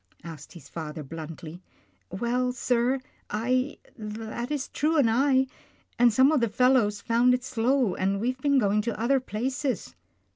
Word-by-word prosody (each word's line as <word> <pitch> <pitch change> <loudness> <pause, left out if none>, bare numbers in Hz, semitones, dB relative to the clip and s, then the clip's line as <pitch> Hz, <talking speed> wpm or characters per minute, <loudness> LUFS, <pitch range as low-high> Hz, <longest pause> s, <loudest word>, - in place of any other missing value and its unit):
" - - -32
asked 150 -1 -13
his 170 -6 -13
father 155 -2 -6
bluntly. 160 +3 -8 0.3
" 95 -1 -41
Well, 250 +2 0
sir, 250 +1 +1 0.3
I 255 +6 0
— - - -25
that 220 +2 -6
is 290 -3 -2
True 315 +2 0
and 275 -6 +4
I, 260 +3 +3 0.5
and 240 -1 +6
some 260 +6 +5
of 305 -5 +2
the 235 - +2
fellows, 230 -3 +3
found 245 +2 +3
it 250 - -5
slow, 255 -2 +1
and 195 +1 0
we 235 +4 0
have 255 0 -14
been 280 0 +3
going 210 -3 +2
to 225 0 -4
other 265 +4 +2
places." 255 - -3
235 Hz, 180 wpm, -27 LUFS, 205-260 Hz, 0.5 s, and